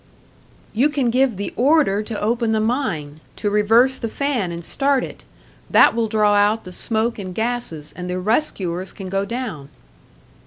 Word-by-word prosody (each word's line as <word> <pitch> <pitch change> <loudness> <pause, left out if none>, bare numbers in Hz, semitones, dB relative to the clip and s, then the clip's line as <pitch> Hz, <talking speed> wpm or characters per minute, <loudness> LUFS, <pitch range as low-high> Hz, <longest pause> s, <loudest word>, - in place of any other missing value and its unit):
"You 260 +7 +3
can 270 -5 0
give 255 -3 +2
the 200 - -4
order 265 -6 +3
to 215 0 -5
open 230 +1 0
the 220 - +2
mine, 195 - -2 0.2
to 205 - -2
reverse 225 +6 +3
the 230 - -3
fan 250 -9 -1
and 170 -1 -6
start 275 -2 +1
it. - - -9 0.4
That - - +6
will 230 -1 0
draw 210 -1 +2
out 205 +2 +3
the 185 - -9
smoke 220 +4 -1
and 185 -2 -6
gases, 220 -10 -3
and 180 0 -6
the 180 - -2
rescuers 190 - -1
can 190 -3 -8
go 195 +1 -1
down." 210 - -5
220 Hz, 170 wpm, -21 LUFS, 190-245 Hz, 0.4 s, That